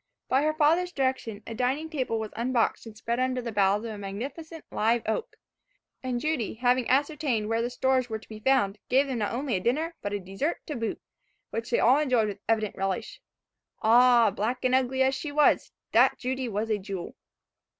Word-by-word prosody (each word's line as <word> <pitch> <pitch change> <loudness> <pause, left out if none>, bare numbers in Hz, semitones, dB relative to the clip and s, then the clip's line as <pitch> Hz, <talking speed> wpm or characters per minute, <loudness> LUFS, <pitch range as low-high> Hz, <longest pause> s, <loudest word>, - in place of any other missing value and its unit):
By 260 +2 +3
her 310 +1 +1
father's 330 +4 +3
direction, 260 - -2
a 230 - -6
dining 260 +7 -1
table 260 -7 -2
was 220 -1 -5
unboxed 235 -1 0
and 215 -1 -11
spread 235 +2 -2
under 255 0 0
the 235 -2 -4
boughs 205 0 +2
of 230 - -4
a 210 - -7
magnificent 275 - -7
live 225 +2 +1
oak, 440 - -2 0.7
and 255 -2 -2
Judy, 285 -8 -1
having 245 +1 +1
ascertained 280 -5 +1
where 225 0 +1
the 240 - -1
stores 255 0 +1
were 220 - -2
to 220 - -17
be 215 -1 -9
found, 215 -5 +2
gave 270 +3 +4
them 260 -4 -3
not 210 - -1
only 255 +1 -2
a - - +1
dinner, 300 - 0
but 205 - -3
a 205 - -2
dessert 195 - -3
to 300 - -5
boot, 230 -2 -3 0.5
which 230 0 -4
they 240 - +2
all 255 +5 +5
enjoyed 250 -7 +2
with 200 0 -7
evident 215 -2 +1
relish. 195 -1 -3 0.6
Ah! 235 0 +6
black 235 +6 -2
and 255 - +2
ugly 260 0 +2
as 265 0 +2
she 290 +2 -4
was, 300 +1 +3 0.2
that - - +5
Judy 255 0 -3
was 220 +1 -2
a 210 - +1
jewel. 190 -2 -6
245 Hz, 200 wpm, -27 LUFS, 220-265 Hz, 0.7 s, Ah